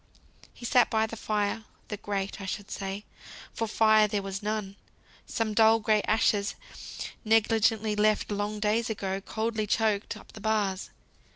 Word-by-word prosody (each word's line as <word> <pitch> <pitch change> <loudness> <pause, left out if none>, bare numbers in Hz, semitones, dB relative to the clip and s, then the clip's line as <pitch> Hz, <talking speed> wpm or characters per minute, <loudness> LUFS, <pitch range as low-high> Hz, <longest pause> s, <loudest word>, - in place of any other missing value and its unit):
He 240 - -11
sat 245 0 +4
by 220 0 +2
the 220 - -6
fire; 215 0 -1 0.3
the 210 - -3
grate 200 -1 -3
I 195 - -6
should 200 +1 -5
say, 195 +1 -4 0.5
for 225 - -2
fire 215 0 +5
there 205 -1 -2
was 195 0 -4
none. 210 -2 -3 0.5
Some 225 -2 -1
dull, 225 +1 +5
gray 215 -1 +2
ashes, 210 -1 +2 0.7
negligently 220 -1 +3
left, 215 0 +2
long 205 +1 -2
days 215 +2 +1
ago, 195 -3 -3
coldly 220 +1 -2
choked 215 -1 0
up - - -15
the 215 - -11
bars. 205 -3 0
215 Hz, 155 wpm, -28 LUFS, 205-220 Hz, 0.7 s, fire